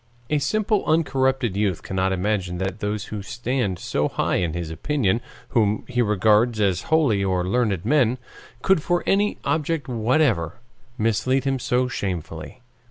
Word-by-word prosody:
A 150 - +3
simple 215 +7 +1
uncorrupted 135 - +1
youth 100 -5 0
cannot 95 0 -1
imagine 95 -1 -1
that 95 +2 -3
those 105 0 -2
who 105 - -3
stand 120 -2 -2
so 75 -3 -1
high - - 0
in 85 -3 -1
his 85 -2 -4
opinion, 115 - 0 0.3
whom 110 -4 +1
he 125 -1 0
regards 110 +2 +3
as 95 -4 +2
holy 140 -11 +3
or 90 -2 0
learned 105 -4 0
men, 130 -2 +3 0.5
could 190 -4 +3
for 175 +2 0
any 205 +1 +2
object 160 -1 -1
whatever 115 - +1 0.4
mislead 125 +4 +1
him 135 -1 0
so 125 +1 +1
shamefully. 90 -1 -5
110 Hz, 150 wpm, -23 LUFS, 95-135 Hz, 0.5 s, A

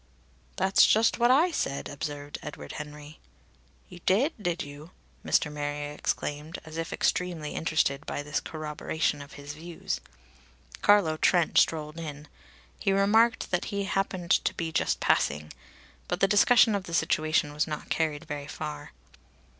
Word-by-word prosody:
"That's 190 0 +5
just 225 +2 +3
what 240 +1 +4
I 310 +8 +5
said!" 140 - -2
observed 145 0 -6
Edward 150 - -8
Henry. 150 0 -9 0.7
"You 175 - -12
did, 255 - +3
did 175 -3 -1
you?" 145 +3 -10 0.3
Mr. 150 - +2
Marrier 145 0 -3
exclaimed, 150 +1 -3
as 160 0 -9
if 165 0 -3
extremely 170 -4 -1
interested 155 -3 0
by 145 - -3
this 150 +1 -1
corroboration 155 -1 -2
of 140 - -11
his 145 +1 -8
views. 165 +2 -5 0.8
Carlo 200 -7 +4
Trent 175 +1 +3
strolled 155 0 0
in; 150 -2 -7 0.5
he 195 - +1
remarked 220 +4 +3
that 180 -1 0
he 200 -2 -2
happened 195 -3 -2
to - - +3
be 165 -1 -3
just - - 0
passing. 75 +1 +1 0.5
But 175 - -2
the 195 - +4
discussion 220 +2 +5
of 200 -2 -2
the 170 - -3
situation 155 -2 +1
was 150 +2 0
not 150 -1 -5
carried 155 -3 0
very 145 -1 -5
far. 75 - -6
160 Hz, 150 wpm, -28 LUFS, 150-190 Hz, 0.8 s, That's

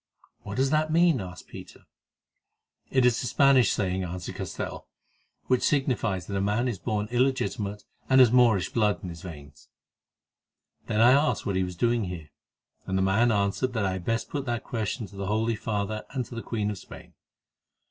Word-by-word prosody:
"What 100 -1 -7
does 135 +2 +1
that 155 0 +1
mean?" 165 - +4
asked 90 -1 -9
Peter. - - -12 1.1
"It 130 -2 +3
is 125 0 +3
a 125 - -3
Spanish 130 +4 +4
saying," 95 -2 -1
answered 90 0 -5
Castell, - - -6 0.6
"which 130 -1 +2
signifies 115 -10 0
that 100 - -5
a 95 - 0
man 105 +5 +1
is 115 -7 -3
born 105 +1 -2
illegitimate, 120 -5 0 0.3
and 130 0 +6
has 125 -3 +7
Moorish 120 -7 +4
blood 105 -3 +1
in 90 - -5
his 85 -2 -9
veins." 75 -4 -11 1.2
"Then 110 - +1
I 120 +2 +7
asked 145 +3 +2
what 100 - -1
he 95 - +2
was 90 -1 -5
doing 115 +3 +1
here, 85 -4 -7 0.6
and 95 0 0
the 95 - +2
man 110 +5 +3
answered 105 +5 0
that 110 -4 0
I 95 - +1
had 95 -1 -5
best 115 0 -1
put 140 -2 -3
that 120 -1 -2
question 110 0 -3
to 100 - -14
the 100 0 -4
Holy 110 +2 0
Father 105 0 -3
and 130 -3 -3
to - - -12
the 115 - -5
Queen 105 -3 -2
of 100 - -6
Spain. - - -13
110 Hz, 190 wpm, -27 LUFS, 95-125 Hz, 1.2 s, has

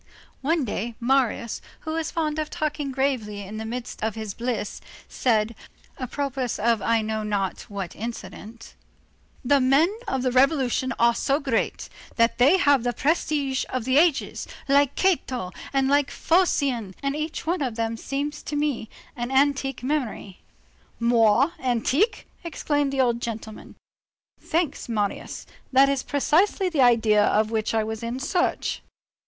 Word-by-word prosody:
One 315 0 +1
day 230 +2 -3
Marius, 245 -2 +1 0.2
who 315 - -5
was 320 -1 -2
fond 310 -2 -1
of 305 -1 -2
talking 300 -2 -2
gravely 255 -7 -1
in 205 +3 -7
the 220 - -5
midst 245 +1 -6
of 220 -2 -1
his 220 -3 -5
bliss, 235 -2 -3 0.3
said, 225 -2 +1 0.5
apropos 270 0 -2
of 230 0 +2
I 230 -1 +2
know 220 0 -2
not 205 -3 -2
what 195 -4 -5
incident: 225 0 -8 0.7
"The 280 +3 +4
men 285 +10 +3
of 265 -9 -1
the 255 - +1
revolution 260 -1 +2
are 235 0 +4
so 275 +4 +1
great, 265 -6 -1 0.3
that 230 +1 +2
they 280 +10 +6
have 285 -6 +4
the 245 +1 -1
prestige 285 -1 0
of 255 -3 -3
the 260 +2 +4
ages, 325 -3 +1 0.2
like 280 0 +3
Cato 260 - 0 0.2
and 270 -1 +2
like 285 0 +3
Phocion, 275 - +1
and 275 0 0
each 310 +2 -4
one 340 +1 0
of 250 -5 -1
them 230 0 -1
seems 285 +5 -4
to 295 - -5
me 290 -7 -1 0.3
an 240 0 -3
antique 270 -1 +1
memory." 255 -9 -3 0.6
"Moire 235 +4 +4
antique!" 265 - +1 0.2
exclaimed 290 -4 -1
the 270 -1 +1
old 240 -2 +1
gentleman. 220 -2 -6 0.6
"Thanks, 325 -6 -2
Marius. 210 -3 -3 0.3
That 270 +1 +6
is 275 -2 0
precisely 345 +8 +2
the 315 -6 +1
idea 225 -4 +5
of 215 +1 +2
which 220 0 -1
I 220 - +2
was 220 0 -5
in 235 +2 -3
search." 350 +6 -1
260 Hz, 150 wpm, -25 LUFS, 230-285 Hz, 0.7 s, they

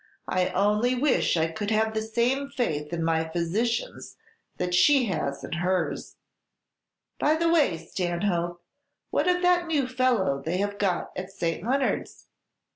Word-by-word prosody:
"I 185 -1 +1
only 210 +6 +2
wish 255 - +2
I 160 - +3
could 205 +4 -4
have 220 0 +1
the 220 - -1
same 240 +5 0
faith 150 - -2
in 170 -1 -2
my 160 0 0
physicians 210 - -2 0.4
that 180 0 -2
she 270 +8 +5
has 140 -8 -3
in - - -7
hers! 175 0 -1 1.0
By 305 +1 +3
the 335 +1 +2
way, 290 - +3
Stanhope, 175 0 -2 0.5
what - - +1
of 360 0 +2
that 355 -1 +3
new 290 -5 +1
fellow 250 - +1
they 170 +4 -1
have 205 +1 -2
got 190 -4 0
at 185 +1 -5
St. 170 -2 -3
Leonard's? 260 +4 -1
205 Hz, 150 wpm, -26 LUFS, 170-255 Hz, 1.0 s, she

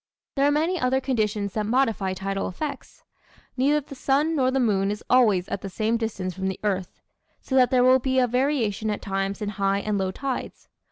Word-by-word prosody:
There 275 0 +3
are - - +3
many 325 +5 +1
other 255 +1 +2
conditions 215 -6 -1
that 210 -1 -2
modify 220 -6 +1
tidal 195 +1 -3
effects. 290 +10 -6 0.5
Neither 285 +3 +2
the 275 - -11
sun 285 +4 +1
nor 260 -3 +2
the 265 +1 0
moon 200 -5 +2
is 210 +1 -4
always 215 -8 +4
at - - -3
the 195 - -5
same 220 +4 0
distance 210 -5 -3
from 190 +1 -3
the 190 - -3
earth. 190 -3 -2 0.4
So - - -8
that 255 -2 +5
there 250 -1 +3
will 255 +1 +6
be 260 +1 -1
a 255 - +5
variation 245 -4 0
at 210 - -3
times 195 +1 -2
in 205 - -2
high 195 -1 0
and 210 -1 -1
low 190 -1 0
tides. 265 +6 -5
225 Hz, 210 wpm, -25 LUFS, 195-265 Hz, 0.5 s, will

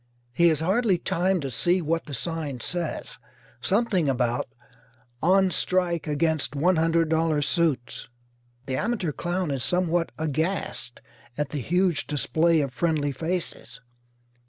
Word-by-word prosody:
He 170 +7 +4
has 160 -2 +2
hardly 195 +3 +2
time 180 +1 0
to 135 -2 -4
see 175 +11 +2
what 165 0 -1
the 145 - -5
sign 155 -3 -3
says 170 +5 -3 0.4
something 190 - +1
about 125 -1 0 0.7
"On 190 +2 +4
Strike 175 -1 +1
Against 155 0 0
$100 165 -1 +2
Suits." 150 -7 -1 0.6
The 130 -1 -2
amateur 210 - -1
clown 175 +1 -2
is 135 -3 -2
somewhat 175 -1 +1
aghast 155 -4 -2 0.4
at 150 -1 -1
the 145 - -3
huge 175 0 +1
display 160 +2 +2
of 135 -3 -3
friendly 150 -1 0
faces. 160 -5 -4
165 Hz, 125 wpm, -25 LUFS, 145-180 Hz, 0.7 s, He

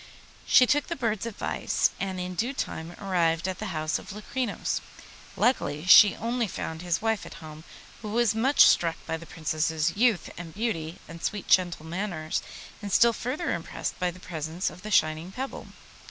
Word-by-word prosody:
She 250 - +7
took 290 +3 +1
the 335 - -3
bird's 230 -5 -1
advice, 225 - 0
and 190 -1 -3
in 180 0 -4
due 235 +9 -1
time 165 -6 -4
arrived 170 -3 +1
at 185 -1 -4
the 215 - -4
house 155 -3 -1
of - - -10
Locrinos. 215 +2 -3 0.6
Luckily 155 - +1
she 200 +2 +9
only 235 0 -1
found 160 -3 -5
his 175 +3 -1
wife 225 -3 0
at - - -10
home, 155 0 -10 0.4
who 215 - -6
was 230 0 +2
much 255 +6 +3
struck 165 -1 +6
by 160 - -2
the 165 0 -12
Princess's 160 0 -1
youth 225 -3 +2
and 165 -1 -9
beauty 180 -8 -2
and 165 0 -10
sweet 205 -2 -3
gentle 175 -4 +3
manners, 170 -2 -3 0.4
and 205 -1 -5
still 235 +4 +5
further 265 +10 -2
impressed 170 - -4
by 180 - +1
the 180 +1 -10
present 165 0 -3
of 180 - -13
the 215 - -7
shining 160 -2 +2
pebble. 265 +6 -6
185 Hz, 180 wpm, -27 LUFS, 165-225 Hz, 0.6 s, she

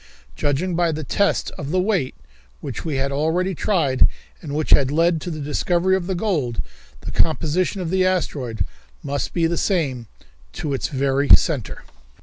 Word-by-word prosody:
Judging 145 - 0
by 170 0 +2
the 155 0 -4
test 200 +7 +1
of 145 0 -4
weight 185 -6 +1 0.4
which - - -6
we 155 -3 -2
had 135 +1 0
already 160 +6 0
tried, 155 -8 +2 0.3
and 145 -3 -5
which 155 0 -1
had 135 -2 +5
led 165 +2 +2
to 180 - -5
the 155 -2 -5
discovery 175 +5 +1
of 180 -2 -2
the 190 - -1
gold, 155 - -1 0.4
the - - -6
composition 165 +4 +1
of 170 -2 -3
the 190 0 +3
asteroid 135 - -1 0.4
must 140 0 -2
be 170 -2 +1
the 170 +1 0
same 135 - 0 0.5
to 145 - -3
its 135 - -1
very 140 0 0
centre. 145 -9 +3
155 Hz, 165 wpm, -22 LUFS, 140-180 Hz, 0.5 s, had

